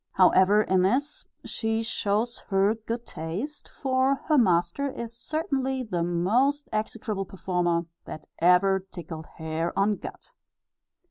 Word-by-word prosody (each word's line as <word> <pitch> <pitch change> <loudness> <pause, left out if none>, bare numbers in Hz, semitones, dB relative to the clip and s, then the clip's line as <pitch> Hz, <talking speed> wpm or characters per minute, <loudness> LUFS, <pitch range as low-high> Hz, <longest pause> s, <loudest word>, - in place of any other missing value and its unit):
However, 190 +3 +5
in 190 -2 +2
this 265 +10 0 0.2
she 225 0 -1
shows 225 +1 0
her 195 +1 +3
good 230 +1 -5
taste, 200 - -6
for 265 0 +1
her 305 - +5
master 180 +6 +2
is 235 -3 -7
certainly 265 -2 -2
the 180 -7 -2
most 220 - +1
execrable 215 -2 -2
performer, 175 -3 -1 0.2
that 155 - -8
ever 180 +3 +4
tickled 170 -4 -9
hair 160 +1 -3
on 200 +1 +2
gut. - - -9
205 Hz, 125 wpm, -26 LUFS, 180-245 Hz, 0.2 s, However